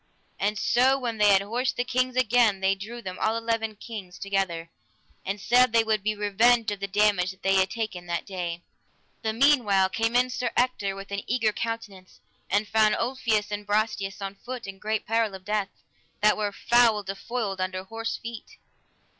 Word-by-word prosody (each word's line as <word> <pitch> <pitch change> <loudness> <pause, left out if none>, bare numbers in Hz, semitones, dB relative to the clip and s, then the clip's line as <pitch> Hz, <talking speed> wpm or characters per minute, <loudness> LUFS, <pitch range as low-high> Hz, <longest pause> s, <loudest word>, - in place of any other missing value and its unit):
And 210 +2 0
so 255 +5 +3
when 235 -4 -4
they 210 - +5
had 195 0 +5
horsed 245 +5 -1
the 245 - +1
kings 255 0 0
again 240 -4 +3
they 190 0 +2
drew 225 +5 -8
them, 185 -1 -6
all 220 +1 +1
eleven 225 -1 -2
kings, 200 -4 -9
together, 190 -4 -2 0.5
and 195 +2 -3
said 245 +4 +4
they 230 -1 +5
would 220 -2 0
be 215 +1 -1
revenged 220 +2 +3
of 205 - -4
the 200 - -3
damage 200 -2 +2
that 190 0 -11
they 195 - +3
had 190 0 +3
taken 200 -5 -4
that 170 0 -2
day. 175 -3 -5 0.6
The 220 - -1
meanwhile 220 -7 +4
came 225 +4 -1
in 250 +1 +3
Sir 250 0 -1
Ector 245 -6 +1
with 195 0 -9
an 200 0 -2
eager 225 -3 +1
countenance, 210 -5 -6 0.3
and 205 +2 +1
found 215 -1 +3
Ulfius 230 -4 -1
and 205 0 -3
Brastias 205 -2 -1
on 195 0 -4
foot, 245 +4 -8
in 195 -1 -8
great 215 +1 -2
peril 225 -3 0
of 185 -1 -12
death, 210 -2 -1 0.5
that 210 0 +5
were 210 -1 -1
foul 230 0 +3
defoiled 195 +1 -4
under 185 0 -3
horse 225 +3 -4
feet. 230 -1 -9
210 Hz, 190 wpm, -26 LUFS, 195-230 Hz, 0.6 s, they